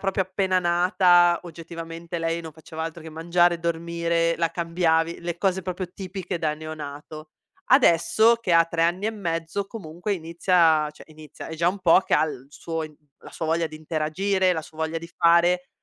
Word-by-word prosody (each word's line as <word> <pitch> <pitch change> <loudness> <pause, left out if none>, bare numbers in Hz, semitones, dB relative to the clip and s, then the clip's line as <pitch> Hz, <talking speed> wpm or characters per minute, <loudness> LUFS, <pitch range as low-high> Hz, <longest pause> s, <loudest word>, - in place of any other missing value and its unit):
proprio 195 -1 0
appena 185 0 0
nata 175 0 +4
oggettivamente 165 0 -7
lei 165 +1 -1
non 160 - -8
faceva 160 +1 -8
altro 165 0 -6
che 160 - -9
mangiare 175 +2 +2
e - - -6
dormire, 170 0 0
la 165 -1 0
cambiavi, 165 -1 0
le 170 0 -4
cose 190 -1 0
proprio 185 +1 -4
tipiche 185 -2 -5
da 155 -2 -1
neonato. 155 0 -8 0.4
Adesso 230 - +5
che 210 -7 -2
ha 165 0 +6
3 165 0 -2
anni 180 +5 +1
e - - +1
mezzo, 170 -1 -3
comunque 185 -1 -5
inizia 165 -2 +2
a - - -6
cioè, 150 - -15
inizia, 155 -2 -11
è 160 - -6
già 170 +2 +2
un 195 +2 -3
po' 180 0 +5
che - - 0
ha - - +4
il 135 -4 -7
suo 165 +2 -5
in 155 -1 -8 0.2
la - - -13
sua 160 - -5
voglia 165 0 0
di 155 - -10
interagire, 175 +5 0
la 160 - -2
sua 160 -1 -15
voglia 160 +1 -2
di 170 - -9
fare 175 +2 +3
170 Hz, 195 wpm, -24 LUFS, 160-180 Hz, 0.4 s, ha